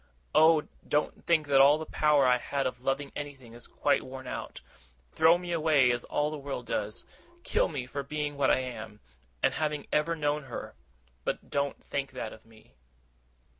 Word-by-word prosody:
Oh, 160 Hz, -1 st, +6 dB, 0.2 s
don't 150 Hz, -, -1 dB
think 160 Hz, -3 st, +3 dB
that 140 Hz, -2 st, +5 dB
all 145 Hz, +2 st, +7 dB
the 160 Hz, -, -5 dB
power 150 Hz, -3 st, +3 dB
I 125 Hz, 0 st, +4 dB
had 140 Hz, +2 st, -2 dB
of 125 Hz, -1 st, -3 dB
loving 140 Hz, +1 st, -1 dB
anything 135 Hz, -5 st, -7 dB
is 120 Hz, 0 st, -8 dB
quite -, -, +1 dB
worn 130 Hz, 0 st, -9 dB
out! 125 Hz, -, -6 dB, 0.5 s
Throw 160 Hz, -, +5 dB
me 175 Hz, 0 st, -6 dB
away, 155 Hz, -6 st, +4 dB
as 120 Hz, 0 st, -2 dB
all 150 Hz, +1 st, 0 dB
the 155 Hz, -, -5 dB
world 140 Hz, 0 st, -5 dB
does. -, -, -3 dB, 0.4 s
Kill -, -, +2 dB
me 140 Hz, -7 st, -4 dB
for 140 Hz, +3 st, -4 dB
being 145 Hz, +1 st, -3 dB
what 140 Hz, -, +2 dB
I -, -, +3 dB
am, 110 Hz, -4 st, -7 dB, 0.4 s
and -, -, +4 dB
having 150 Hz, -2 st, -2 dB
ever 165 Hz, +3 st, +2 dB
known 150 Hz, -1 st, -1 dB
her; 125 Hz, -, -7 dB, 0.5 s
but -, -, -4 dB
don't 140 Hz, 0 st, -1 dB
think 135 Hz, -1 st, -4 dB
that 110 Hz, -, -5 dB
of 110 Hz, -, -16 dB
me! 110 Hz, -1 st, -20 dB
140 Hz, 185 wpm, -29 LUFS, 130-150 Hz, 0.5 s, all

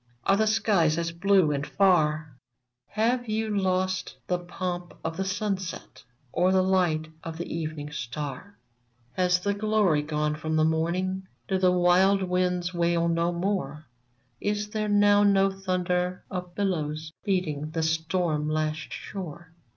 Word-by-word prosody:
Are 195 Hz, -, +4 dB
the 220 Hz, +2 st, +2 dB
skies 195 Hz, -7 st, +2 dB
as 170 Hz, 0 st, -1 dB
blue 185 Hz, -1 st, +3 dB
and 140 Hz, -1 st, -1 dB
far? 155 Hz, -5 st, +2 dB, 0.5 s
Have 240 Hz, +3 st, 0 dB
you 215 Hz, 0 st, -1 dB
lost 185 Hz, -1 st, 0 dB
the 180 Hz, -1 st, 0 dB
pomp 175 Hz, 0 st, -5 dB
of 165 Hz, 0 st, -3 dB
the 190 Hz, -, -1 dB
sunset, 190 Hz, -1 st, -4 dB, 0.3 s
Or 180 Hz, +5 st, +2 dB
the 190 Hz, 0 st, +4 dB
light 175 Hz, -5 st, +1 dB
of 165 Hz, -1 st, -6 dB
the 170 Hz, -, -4 dB
evening 155 Hz, -2 st, -4 dB
star? 145 Hz, +7 st, -6 dB, 0.6 s
Has 180 Hz, -1 st, +2 dB
the 200 Hz, +3 st, 0 dB
glory 205 Hz, -6 st, +2 dB
gone 150 Hz, 0 st, -1 dB
from 155 Hz, +1 st, -2 dB
the 155 Hz, -, +3 dB
iiiorning? 170 Hz, +4 st, 0 dB, 0.3 s
Do 190 Hz, -1 st, 0 dB
the 185 Hz, -1 st, +4 dB
wild 180 Hz, +2 st, +4 dB
winds 180 Hz, 0 st, 0 dB
wail 170 Hz, -1 st, +1 dB
no 170 Hz, +1 st, +1 dB
more? 170 Hz, -5 st, -2 dB, 0.5 s
Is 210 Hz, 0 st, -1 dB
there 215 Hz, -1 st, -1 dB
now 205 Hz, 0 st, +5 dB
no 195 Hz, -1 st, +4 dB
thunder 180 Hz, -1 st, -1 dB
of 180 Hz, -2 st, -5 dB
billows 155 Hz, -6 st, -2 dB
Beating 160 Hz, -7 st, -1 dB
the 160 Hz, +1 st, -2 dB
stortn 160 Hz, -1 st, 0 dB
lashed 155 Hz, 0 st, -2 dB
shore 175 Hz, -3 st, -7 dB
180 Hz, 145 wpm, -27 LUFS, 160-195 Hz, 0.6 s, now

